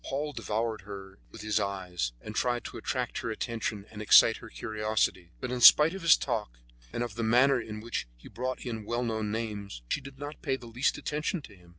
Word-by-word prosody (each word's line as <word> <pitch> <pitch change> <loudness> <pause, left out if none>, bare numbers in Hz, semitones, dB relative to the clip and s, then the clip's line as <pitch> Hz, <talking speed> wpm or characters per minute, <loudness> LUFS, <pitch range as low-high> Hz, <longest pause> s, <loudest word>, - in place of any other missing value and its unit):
Paul 145 +2 -3
devoured 110 -2 -2
her 95 -3 -10
with - - -11
his 110 0 +1
eyes, 90 - -2
and 110 - -7
tried 120 0 0
to - - -7
attract 125 -2 -2
her 115 - -3
attention 110 -2 -3
and 105 -1 -8
excite 105 - +7
her - - -11
curiosity; 105 - -1
but 130 - -4
in 125 -1 -2
spite 150 +6 +9
of 195 - -6
his 165 -1 +7
talk, 105 - -3 0.3
and 120 - -2
of 120 -3 -5
the 115 - -4
manner 125 +3 +4
in 105 -1 -7
which 115 - -3
he - - -14
brought 130 +2 -4
in 115 -3 -4
well 120 +3 -2
known 110 -2 -1
names, 105 - -4
she - - 0
did 135 0 -11
not 145 +2 -7
pay 135 - 0
the 125 - -10
least 120 +3 0
attention 150 +3 -2
to 100 - -13
him. 90 -2 -20
115 Hz, 220 wpm, -29 LUFS, 105-125 Hz, 0.3 s, spite